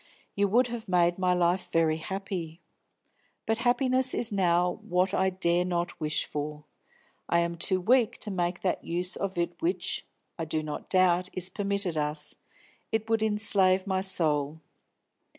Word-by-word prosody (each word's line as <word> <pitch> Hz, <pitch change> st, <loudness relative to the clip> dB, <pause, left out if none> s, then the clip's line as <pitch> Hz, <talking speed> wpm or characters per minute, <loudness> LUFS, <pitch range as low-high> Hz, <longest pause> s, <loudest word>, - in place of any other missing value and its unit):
You 200 Hz, 0 st, +1 dB
would 240 Hz, +6 st, +3 dB
have 235 Hz, -2 st, -6 dB
made 175 Hz, 0 st, +2 dB
my 180 Hz, -1 st, +2 dB
life 180 Hz, +1 st, 0 dB
very 160 Hz, -1 st, +2 dB
happy. 180 Hz, -2 st, -5 dB, 0.9 s
But 225 Hz, 0 st, 0 dB
happiness 255 Hz, +1 st, +2 dB
is 235 Hz, -1 st, +2 dB
now 180 Hz, -2 st, +1 dB
what 180 Hz, +2 st, 0 dB
I 190 Hz, -1 st, +2 dB
dare 180 Hz, -1 st, +1 dB
not 175 Hz, -1 st, -3 dB
wish 155 Hz, 0 st, -1 dB
for. 150 Hz, 0 st, -5 dB, 0.7 s
I 170 Hz, -, +3 dB
am 170 Hz, 0 st, 0 dB
too 185 Hz, +2 st, +1 dB
weak 235 Hz, +4 st, +2 dB
to 210 Hz, -, -1 dB
make 175 Hz, -1 st, -2 dB
that 185 Hz, -, -1 dB
use 180 Hz, +2 st, -2 dB
of 195 Hz, -2 st, -4 dB
it 170 Hz, 0 st, -2 dB
which, 345 Hz, +3 st, -2 dB, 0.3 s
I 165 Hz, -, -2 dB
do 155 Hz, 0 st, -2 dB
not 150 Hz, -1 st, -6 dB
doubt, 185 Hz, -1 st, +3 dB
is 185 Hz, 0 st, +1 dB
permitted 200 Hz, -5 st, -1 dB
us; 150 Hz, 0 st, -3 dB, 0.6 s
it 220 Hz, 0 st, -2 dB
would 225 Hz, -1 st, +2 dB
enslave 205 Hz, -3 st, +4 dB
my 190 Hz, -1 st, -1 dB
soul. 155 Hz, -5 st, 0 dB
185 Hz, 160 wpm, -28 LUFS, 170-200 Hz, 0.9 s, enslave